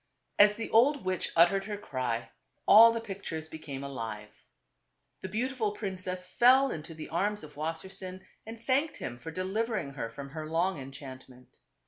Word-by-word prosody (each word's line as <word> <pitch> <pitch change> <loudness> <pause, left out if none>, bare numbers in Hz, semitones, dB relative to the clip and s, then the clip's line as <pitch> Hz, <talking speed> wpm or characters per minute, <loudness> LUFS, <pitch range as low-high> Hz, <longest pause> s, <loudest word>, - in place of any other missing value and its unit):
As 205 0 +7
the 225 - -5
old 265 +2 +4
witch 185 -1 -1
uttered 195 +4 +5
her 210 -1 -4
cry, 130 - -3 0.4
all 230 +2 +10
the 230 - -2
pict 200 -3 -8
ures 160 -1 -4
became 140 -4 -7
alive. 110 -6 -6 0.9
The 190 - -5
beautiful 225 0 -1
princess 185 -3 -5
fell 260 +7 +5
into 160 +1 -7
the 155 - -8
arms 205 +4 -1
of 150 -1 -11
Wassersein 185 +4 -5 0.2
and 225 +1 -9
thanked 270 +6 0
him 120 0 -6
for 160 - -7
delivering 190 -2 -2
her 120 -4 -4
from 140 +5 -8
her 155 0 -6
long 170 +1 +1
enchantment. 130 -2 -11
185 Hz, 160 wpm, -30 LUFS, 145-215 Hz, 0.9 s, all